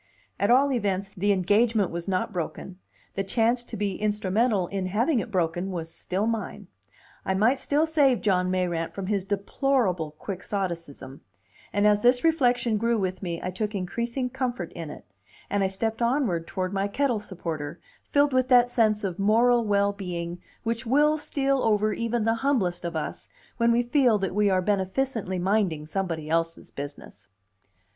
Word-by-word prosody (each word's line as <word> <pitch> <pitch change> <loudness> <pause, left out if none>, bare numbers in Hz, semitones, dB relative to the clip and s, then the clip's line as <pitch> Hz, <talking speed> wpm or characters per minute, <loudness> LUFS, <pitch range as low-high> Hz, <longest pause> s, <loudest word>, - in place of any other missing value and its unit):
At 200 - +2
all 270 +3 +5
events, 200 -5 -1
the 205 +1 0
engagement 205 +2 +2
was 170 +1 -5
not 190 +3 -1
broken, 180 +1 -5 0.3
the 195 - -1
chance 230 +4 +1
to 225 - -7
be 200 -2 -2
instrumental 210 0 +1
in 195 -2 -2
having 235 - +1
it 235 - -4
broken 175 -1 -1
was 165 -3 -5
still 190 +3 -2
mine; 215 -2 -3 0.6
I 190 - 0
might 230 +7 +3
still 295 +2 +1
save 285 -7 +3
John 185 -3 +2
Mayrant 175 -3 -1
from 195 - -4
his 195 -1 -1
deplorable 200 - 0
quixotism; 170 -8 -5 0.5
and 205 +1 +1
as 210 0 +4
this 245 +1 +4
reflection 245 -8 +2
grew 230 +2 +1
with 185 -2 -2
me 170 -3 -3
I 185 - -2
took 210 +3 -3
increasing 235 +7 -2
comfort 245 -9 -3
in 165 -3 -6
it, - - -10 0.5
and 200 -1 +1
I - - +3
stepped 220 +4 -3
onward 235 - +1
toward 185 0 -3
my 195 0 0
kettle 245 +1 0
supporter, 165 -5 -5 0.3
filled 285 -1 +3
with 255 0 +2
that 245 -1 +5
sense 215 -3 +2
of 190 -1 -3
moral 235 +4 +4
well 200 -1 +2
being 175 -3 -5 0.2
which 230 0 -2
will 295 +5 +3
steal 275 -2 0
over 215 -1 +2
even 230 -1 -1
the 225 - +3
humblest 215 -12 +1
of 170 - -4
us - - -4 0.3
when 235 -1 +3
we 235 +1 +3
feel 245 -3 +3
that 195 -3 -2
we 205 0 +3
are 185 -1 +2
beneficently 200 +1 -1
minding 180 -5 0
somebody 165 -3 -3
else's 165 +1 -1
business. 145 +1 -8
205 Hz, 170 wpm, -26 LUFS, 185-235 Hz, 0.6 s, all